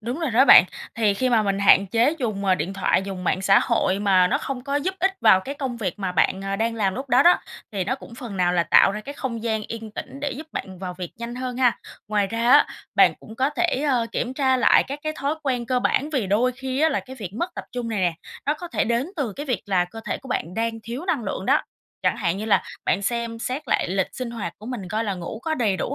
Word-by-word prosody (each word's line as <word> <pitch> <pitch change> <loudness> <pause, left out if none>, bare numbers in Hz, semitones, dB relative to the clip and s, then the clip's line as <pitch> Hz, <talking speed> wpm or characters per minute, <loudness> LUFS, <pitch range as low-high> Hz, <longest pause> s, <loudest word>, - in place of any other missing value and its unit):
đúng 240 +7 -4
rồi 320 -6 -1
đó 250 +4 +5
bạn. 180 - +9 0.3
Thì 210 -3 +2
khi 255 +5 0
mà 225 -2 +4
mình 195 -1 0
hạn 200 0 +5
chế 235 - +2
dùng, 215 -6 -2
ờ, 190 -1 +4
điện 180 +3 -3
thoại, 195 -1 +1
dùng 190 -2 -6
mạng 185 +2 0
xã 195 0 +6
hội 190 +1 +1
mà 190 -3 +4
nó - - +1
không 260 -2 -5
có 280 0 -1
giúp 370 +7 -1
ích 380 +2 +2
vào 190 - +6
cái 280 +8 -6
công 265 -4 -4
việc 200 -5 -3
mà 185 -2 -2
bạn, 190 +3 +1
à, 195 0 -2
đang 225 +1 0
làm 195 -4 0
lúc 265 +1 -6
đó 250 +3 +5
đó, 350 - +5 0.3
thì 190 -3 -1
nó 260 - 0
cũng 255 -3 -12
phần 235 -5 -7
nào 180 -1 +2
là 175 -1 +3
tạo 195 - +5
ra 210 - -4
cái 280 +7 -8
không 235 -5 -4
gian 220 -2 -1
yên 225 -1 -6
tĩnh 275 +5 -8
để 290 -1 -1
giúp 310 +4 -8
bạn 190 -2 -6
vào 180 -1 -5
việc 180 -1 -6
nhanh 235 +1 -6
hơn 250 -1 -4
ha. 250 -2 +2 0.3
Ngoài 210 -2 +1
ra 230 +3 0
á, - - +7 0.3
bạn - - +5
cũng 220 - -12
có 265 +4 +1
thể, 300 -3 0
à, 245 -4 +2
kiểm 250 +2 -2
tra 265 -2 +2
lại 250 - +5
các 280 +2 -5
cái 310 0 -2
thói 285 +3 -1
quen 250 -4 -1
cơ 250 0 +1
bản. 290 +4 +1
Vì 260 -9 0
đôi 230 +6 +2
khi 265 +1 -4
á 320 - +5
là - - 0
cái 260 0 -11
việc 200 -7 -6
mất 345 +9 -2
tập - - -6
trung 245 -2 -3
này 220 -3 -2
nè, 175 -3 +1 0.3
nó 295 - +2
có 350 +3 -8
thể - - 0
đến 235 +5 0
từ 255 -9 -2
cái 290 +6 -7
việc 245 -7 -1
là 185 -3 +2
cơ 225 +6 -10
thể - - -3
của 265 - -13
bạn 175 -4 -3
đang 225 0 -1
thiếu 240 +9 -6
năng 290 - -1
lượng 195 0 -4
đó. 285 +3 +3 0.4
Chẳng - - +2
hạn 180 -2 -1
như 210 - -4
là 215 - +3 0.2
bạn 200 - +1
xem 235 +1 -2
xét 255 +6 -3
lại - - +1
lịch 190 +1 0
sinh 250 -2 -4
hoạt 225 -3 -5
của 215 - -11
mình, 235 -8 -5
coi 220 +4 -1
là 200 -2 -1
ngủ 180 +5 -6
có 320 -1 -1
đầy 215 -8 +1
đủ 275 - -3
230 Hz, 280 wpm, -23 LUFS, 195-265 Hz, 0.4 s, bạn